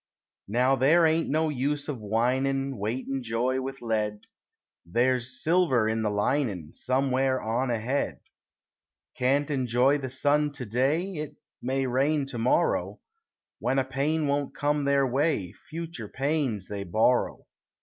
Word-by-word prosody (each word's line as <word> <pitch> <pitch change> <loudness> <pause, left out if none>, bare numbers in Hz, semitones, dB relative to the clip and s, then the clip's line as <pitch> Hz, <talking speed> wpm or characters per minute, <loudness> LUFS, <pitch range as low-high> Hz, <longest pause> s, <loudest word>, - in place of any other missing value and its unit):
Now 125 +6 +3
there 150 +6 +4
ain't 160 +1 +2
no 155 +2 +1
use 145 +1 -1
of 145 -5 -4
whining 130 +4 0
Weightin' 130 +6 -2
joy 125 +3 0
with 135 0 -6
lead; 105 -2 -1 0.6
There 120 +9 +2
is 125 +1 -7
silver 155 -9 +3
in 110 0 0
the 110 - +1
linin' 105 - -1
Somewhere 130 0 +1
on 120 +4 -1
ahead. 120 +4 -1 0.9
Can't 140 +4 +1
enjoy 130 +1 +2
the 130 -1 -4
sun 145 +3 +1
to 130 - -6
day 130 - +1
It 155 -3 -5 0.3
may 135 +2 0
rain 140 +3 +1
to 120 -4 -5
morrow; 120 +3 +1 0.6
When 130 +3 0
a 135 - +2
pain 145 +4 0
won't 140 0 -1
come 145 0 0
their 140 -1 +3
way, 130 - 0 0.2
Future 160 -8 -6
pains 135 - -1
they 100 -1 -4
borrow. 110 +7 +1
130 Hz, 140 wpm, -27 LUFS, 120-145 Hz, 0.9 s, there